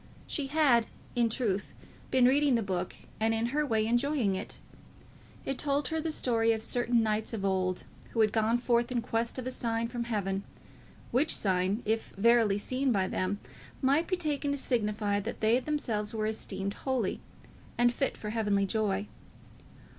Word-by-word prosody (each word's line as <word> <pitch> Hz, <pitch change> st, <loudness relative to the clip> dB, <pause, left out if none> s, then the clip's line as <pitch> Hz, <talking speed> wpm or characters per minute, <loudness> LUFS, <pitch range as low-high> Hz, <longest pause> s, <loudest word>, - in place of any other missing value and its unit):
She 285 Hz, -3 st, -2 dB
had 270 Hz, -6 st, +3 dB, 0.3 s
in 235 Hz, -1 st, +3 dB
truth 215 Hz, -4 st, -1 dB, 0.4 s
been 260 Hz, -1 st, +4 dB
reading 275 Hz, +1 st, +4 dB
the 230 Hz, -, +1 dB
book, 185 Hz, -2 st, -3 dB, 0.2 s
and 225 Hz, +1 st, +2 dB
in 225 Hz, +1 st, 0 dB
her 300 Hz, +1 st, +2 dB
way 220 Hz, -6 st, +1 dB
enjoying 240 Hz, -2 st, +1 dB
it. 190 Hz, +2 st, -4 dB, 0.9 s
It 270 Hz, -, -3 dB
told 285 Hz, -1 st, 0 dB
her 320 Hz, 0 st, -1 dB
the 320 Hz, 0 st, -1 dB
story 230 Hz, -5 st, +2 dB
of 220 Hz, -1 st, -1 dB
certain 240 Hz, -1 st, +2 dB
knights 215 Hz, +1 st, -1 dB
of 200 Hz, -3 st, -2 dB
old, 185 Hz, -1 st, 0 dB, 0.3 s
who 230 Hz, -, 0 dB
had 215 Hz, -1 st, +4 dB
gone 220 Hz, +1 st, +2 dB
forth 240 Hz, 0 st, +1 dB
in 240 Hz, -2 st, 0 dB
quest 230 Hz, 0 st, -1 dB
of 255 Hz, -, -4 dB
a 255 Hz, -, -2 dB
sign 230 Hz, -2 st, -1 dB
from 240 Hz, -1 st, -3 dB
heaven, 195 Hz, -4 st, -1 dB, 0.7 s
which 270 Hz, +6 st, +3 dB
sign, 190 Hz, +3 st, +1 dB
if 220 Hz, +1 st, -1 dB
verily 225 Hz, -1 st, +4 dB
seen 255 Hz, +5 st, 0 dB
by 195 Hz, -4 st, +2 dB
them, 185 Hz, +3 st, -1 dB, 0.4 s
might 285 Hz, +5 st, +2 dB
be 370 Hz, -, 0 dB
taken 295 Hz, -4 st, -1 dB
to 285 Hz, -, 0 dB
signify 210 Hz, -5 st, 0 dB
that 220 Hz, +3 st, -5 dB
they 225 Hz, +3 st, +3 dB
themselves 230 Hz, -7 st, -2 dB
were 215 Hz, -1 st, -1 dB
esteemed 200 Hz, -2 st, -3 dB
holy, 255 Hz, -4 st, -1 dB, 0.6 s
and 240 Hz, 0 st, +4 dB
fit 270 Hz, +2 st, -1 dB
for 210 Hz, -, -5 dB
heavenly 205 Hz, -3 st, +1 dB
joy. 200 Hz, -1 st, 0 dB
230 Hz, 175 wpm, -30 LUFS, 210-255 Hz, 0.9 s, been